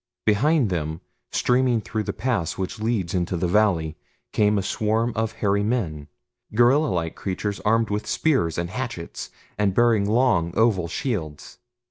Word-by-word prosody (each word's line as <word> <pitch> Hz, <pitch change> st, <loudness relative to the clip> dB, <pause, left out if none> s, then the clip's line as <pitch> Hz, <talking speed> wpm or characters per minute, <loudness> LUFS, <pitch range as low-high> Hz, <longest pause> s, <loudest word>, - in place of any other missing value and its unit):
Behind 120 Hz, -, +3 dB
them, 80 Hz, -2 st, -2 dB, 0.3 s
streaming 125 Hz, -1 st, +2 dB
through 110 Hz, 0 st, -3 dB
the -, -, -3 dB
pass 105 Hz, -7 st, -2 dB
which 95 Hz, +2 st, -4 dB
leads 110 Hz, -6 st, -1 dB
into 90 Hz, -1 st, -1 dB
the 90 Hz, -, 0 dB
valley, 85 Hz, -5 st, +2 dB, 0.4 s
came 105 Hz, 0 st, +3 dB
a 100 Hz, -, 0 dB
swarm 110 Hz, +4 st, 0 dB
of 110 Hz, 0 st, -1 dB
hairy 100 Hz, -2 st, +1 dB
men 95 Hz, -10 st, -2 dB, 0.5 s
gorilla 130 Hz, +7 st, +4 dB
like 85 Hz, -, -2 dB
creatures 100 Hz, +1 st, -3 dB
armed 110 Hz, 0 st, +1 dB
with 105 Hz, +1 st, -2 dB
spears 130 Hz, -, +1 dB
and 85 Hz, +1 st, -2 dB
hatchets, 115 Hz, -8 st, -5 dB, 0.3 s
and 100 Hz, -2 st, +1 dB
bearing 115 Hz, -4 st, +3 dB
long, 105 Hz, -8 st, +2 dB
oval 105 Hz, -7 st, +3 dB
shields. 85 Hz, -, -4 dB
105 Hz, 150 wpm, -24 LUFS, 90-115 Hz, 0.5 s, gorilla